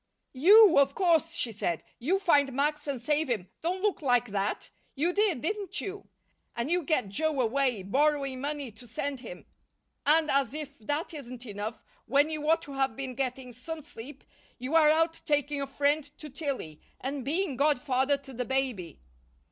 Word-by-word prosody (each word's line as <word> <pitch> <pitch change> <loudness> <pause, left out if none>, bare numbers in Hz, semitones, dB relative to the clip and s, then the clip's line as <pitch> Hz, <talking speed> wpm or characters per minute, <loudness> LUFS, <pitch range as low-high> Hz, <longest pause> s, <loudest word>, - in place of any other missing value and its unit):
"You, 370 +5 +7
of 275 0 +3
course," 335 -3 +2
she 240 - 0
said. 175 -6 -2 0.2
"You 335 +11 +1
find 290 -8 +3
Max 295 +2 0
and 275 -3 -2
save 295 +5 +1
him 205 -7 -2
don't 365 +3 -2
look 415 -5 +1
like 245 -4 +2
that! 200 +1 -2 0.2
You 330 +6 +1
did, 400 - +2
didn't 400 +1 -2
you? 395 0 -6 0.5
And 235 +6 -2
you 355 +1 +3
get 280 - 0
Joe 305 +7 -1
away, 250 -3 +1
borrowing 275 +4 +1
money 285 -3 -3
to 225 +3 -14
send 275 +4 -3
him. 200 -8 -10 0.6
And 310 +1 +4
as 275 -1 +1
if 290 -3 -6
that 290 +10 -3
isn't 255 -4 -8
enough, 210 +1 -6 0.2
when 285 +5 +3
you 305 -1 -2
ought 325 +1 +3
to 280 - -9
have 270 -3 0
been 265 0 -5
getting 255 0 -3
some 310 +6 -7
sleep, 285 -1 -10 0.3
you 255 +4 -5
are 315 -2 +6
out 325 +1 +2
taking 290 -1 0
a 275 - -2
friend 290 +2 +1
to 300 -2 -8
Tillie, 265 - -4 0.2
and 270 +1 -4
being 315 +2 -1
godfather 280 -1 +2
to 275 -1 -13
the 250 +1 -2
baby." 250 - -2
280 Hz, 180 wpm, -29 LUFS, 250-310 Hz, 0.6 s, You